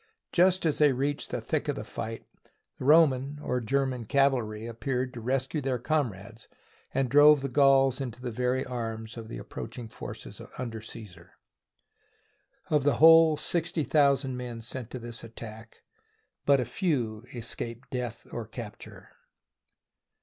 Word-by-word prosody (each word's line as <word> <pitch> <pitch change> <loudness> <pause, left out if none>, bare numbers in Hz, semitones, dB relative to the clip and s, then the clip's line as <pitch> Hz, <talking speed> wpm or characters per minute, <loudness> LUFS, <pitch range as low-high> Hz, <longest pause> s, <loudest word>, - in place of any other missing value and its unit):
Just 185 0 +3
as 155 - +1
they 150 -3 +5
reached 140 +3 -1
the - - -2
thick - - -2
of - - 0
the - - -5
fight, 115 0 -6 0.5
the - - -5
Roman 145 -2 +4
(or 125 - 0
German) 130 0 -1
cavalry 120 -5 +1
appeared 125 +2 -3
to 120 - -7
rescue 135 +5 -1
their 130 -2 -1
com 140 0 0
rades 105 +4 -13 0.4
and 135 -1 +1
drove 145 +2 +7
the 140 - -2
Gauls 135 0 +4
into 125 -3 -5
the 125 -1 -4
very 125 +3 0
arms 115 -2 -5
of 115 -2 -8
the 115 - -7
approaching 120 -2 -7
forces - - -9 0.2
under 115 -3 -5
Caesar. 95 -6 -11 1.4
Of 150 -3 +3
the 145 0 +3
whole 160 -1 +7
sixty 165 0 -1
thousand 140 -3 +2
men 120 -2 -6
sent 120 +1 -6
to - - -6
this 120 -1 -7
at 115 0 -12
tack, 110 0 -10 0.6
but 140 -3 +4
few 120 - -1
escaped 120 +1 -5
death 125 -3 -4
or 115 -3 -5
capture. 110 -2 -9
125 Hz, 150 wpm, -28 LUFS, 115-140 Hz, 1.4 s, drove